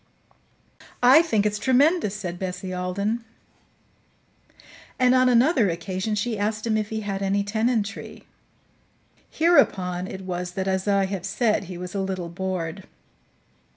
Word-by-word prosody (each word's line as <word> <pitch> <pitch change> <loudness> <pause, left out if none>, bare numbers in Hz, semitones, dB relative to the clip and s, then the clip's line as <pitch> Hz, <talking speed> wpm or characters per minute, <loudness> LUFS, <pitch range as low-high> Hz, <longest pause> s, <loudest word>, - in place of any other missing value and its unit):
"I 260 +6 +8
think 220 -11 0
it's 210 0 0
tremendous," 260 - +2
said 180 -4 -5
Bessie 185 0 -5
Alden; 200 +6 -2 1.7
and 255 -1 +4
on 255 0 +4
another 245 - +4
occasion 185 +5 -3
she 215 +1 -2
asked 215 +2 -2
him 225 -2 +1
if 215 -1 -1
he 220 0 -3
had 200 -2 -4
any 200 +1 +1
tenantry. 220 +1 -2 1.1
Hereupon 185 - +2
it 190 - -7
was 180 -1 -4
that, 190 +1 -3
as 190 +1 -1
I 200 -1 +3
have 190 -2 -4
said, 210 0 0
he 180 0 -8
was 180 0 -7
a 200 - -1
little 185 -3 -3
bored. 185 0 -4
200 Hz, 140 wpm, -24 LUFS, 185-225 Hz, 1.7 s, I